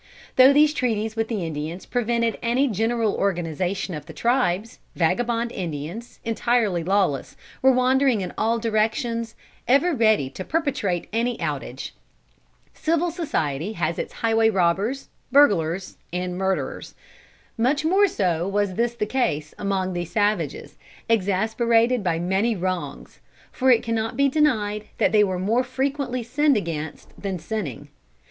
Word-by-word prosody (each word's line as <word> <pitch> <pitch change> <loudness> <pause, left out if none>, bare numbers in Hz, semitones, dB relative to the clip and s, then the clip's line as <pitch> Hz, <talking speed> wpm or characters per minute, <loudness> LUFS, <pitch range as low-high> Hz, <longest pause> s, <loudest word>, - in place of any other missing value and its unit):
Though 260 +1 +8
these 300 +1 +5
treaties 225 -5 -1
with 225 0 -1
the 210 -7 -2
Indians 160 +3 -5
prevented 235 -1 0
any 250 +4 +2
general 225 0 0
organization 185 0 -1
of 150 - -7
the - - -9
tribes, 230 -4 0 0.2
vagabond 230 +7 0
Indians, 175 +5 -6
entirely 225 -6 +1
lawless, 185 -6 0 0.2
were 265 - +6
wandering 255 -2 +3
in 180 - -5
all 230 +2 +1
directions, 225 +1 -1 0.3
ever 280 +7 +4
ready 220 - +3
to 185 - -6
perpetrate 255 - -1
any 235 +1 0
outrage. 140 -5 -4 0.8
Civil 335 +2 0
society 185 - -2
has 170 -3 -2
its - - -4
highway 225 0 +4
robbers, 195 +7 0 0.2
burglars 190 - +3
and 180 0 -3
murderers. 190 0 -2 0.6
Much 270 +6 +1
more 390 +5 +4
so 180 - 0
was 200 -1 0
this 235 +4 0
the 215 - -1
case 155 - -1
among 190 -2 -1
these 175 -1 -4
savages, 210 0 -1 0.3
exasperated 225 +3 +2
by 170 -3 +1
many 190 +7 +1
wrongs; 185 -1 -4 0.3
for 260 -1 +1
it 240 -3 +5
cannot 225 +1 -2
be 280 0 +4
denied 220 -8 +1
that - - +2
they 210 -1 +5
were 190 -2 -1
more 220 +7 +1
frequently 260 -1 -2
sinned 280 +3 +2
against 160 -5 -5
than 195 -2 -2
sinning. 170 - -5
220 Hz, 140 wpm, -23 LUFS, 185-245 Hz, 0.8 s, Though